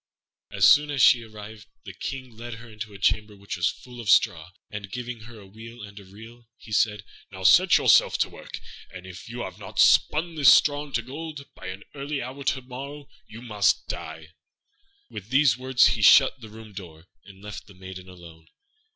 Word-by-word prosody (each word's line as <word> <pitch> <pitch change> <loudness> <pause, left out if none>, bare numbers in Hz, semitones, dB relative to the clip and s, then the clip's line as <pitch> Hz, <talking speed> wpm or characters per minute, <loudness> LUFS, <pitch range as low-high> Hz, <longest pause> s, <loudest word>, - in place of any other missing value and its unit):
As - - +2
soon 150 0 +5
as 140 -4 +1
she 120 - +6
arrived 110 -1 -12 0.2
the - - -9
King 130 -4 -7
led 120 +1 -8
her 115 +2 -13
into 105 -1 -9
a 100 - -11
chamber 105 +1 0
which 100 -1 -7
was 85 -2 +1
full 125 -1 -10
of 110 - -6
straw; 80 -2 +3 0.2
and, 105 -2 -8
giving 125 0 -6
her 115 -1 -13
a 100 - -14
wheel 110 +3 -12
and 100 0 -11
a - - -13
reel, 110 +5 -15
he 110 - -15
said, 105 0 +1 0.3
"Now 95 -1 -9
set 175 - +6
yourself - - +4
to - - +1
work, - - -10 0.3
and 90 -1 -11
if 95 +3 -11
you 120 +1 -6
have - - -7
not - - -11
spun 165 +3 +3
this 145 -5 +6
straw 145 +2 +4
into 135 -5 -3
gold 145 +2 -8
by - - -11
an 95 +2 -7
early 140 +1 -4
hour 135 +2 -7
to 130 0 -1
morrow, 140 +3 -9 0.2
you 115 +2 -12
must 105 -4 +1
die." 80 0 -8 0.8
With 100 - -9
these 135 -1 +4
words 130 +1 +3
he 110 - -2
shut 130 +4 +6
the 110 - -11
room 110 -1 -13
door, 85 -4 -11 0.2
and 95 -1 -16
left 105 0 -9
the 100 - -16
maiden 95 0 -11
alone. 85 -3 -15
110 Hz, 205 wpm, -25 LUFS, 100-130 Hz, 0.8 s, she